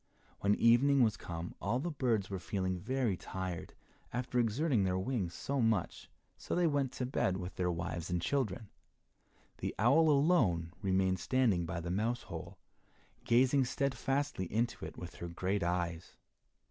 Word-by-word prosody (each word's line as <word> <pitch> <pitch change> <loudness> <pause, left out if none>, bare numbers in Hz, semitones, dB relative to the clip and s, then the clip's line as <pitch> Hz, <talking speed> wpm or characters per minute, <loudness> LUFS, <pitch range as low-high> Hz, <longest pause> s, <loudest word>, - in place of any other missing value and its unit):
When 100 +1 +3
evening 130 +4 +5
was 110 -3 +2
come 85 0 -6
all 110 +5 0
the 170 +6 -2
birds 115 -9 0
were 95 - -2
feeling 95 0 -2
very 125 0 0
tired 95 -1 -5 0.4
after 125 0 -1
exerting 120 0 +2
their 95 -1 +1
wings 95 -4 -2
so 140 -1 -1
much, 110 -6 0 0.3
so - - -3
they 175 - +3
went 140 -4 +1
to 125 - -2
bed 95 -7 0
with 90 0 -5
their 90 -1 -1
wives 85 0 -3
and 90 0 0
children. 110 -2 -1 0.9
The - - -3
owl 140 +9 +5
alone 130 - +3
remained 95 -1 +1
standing 105 -6 +2
by 85 0 -3
the 85 +1 -4
mouse 115 +6 0
hole, - - -8 0.7
gazing 130 +3 +4
steadfastly 135 -5 -1
into 120 +3 -1
it - - -9
with 85 - -8
her 85 - -5
great 95 +4 -1
eyes. 85 -1 -2
105 Hz, 160 wpm, -33 LUFS, 90-130 Hz, 0.9 s, evening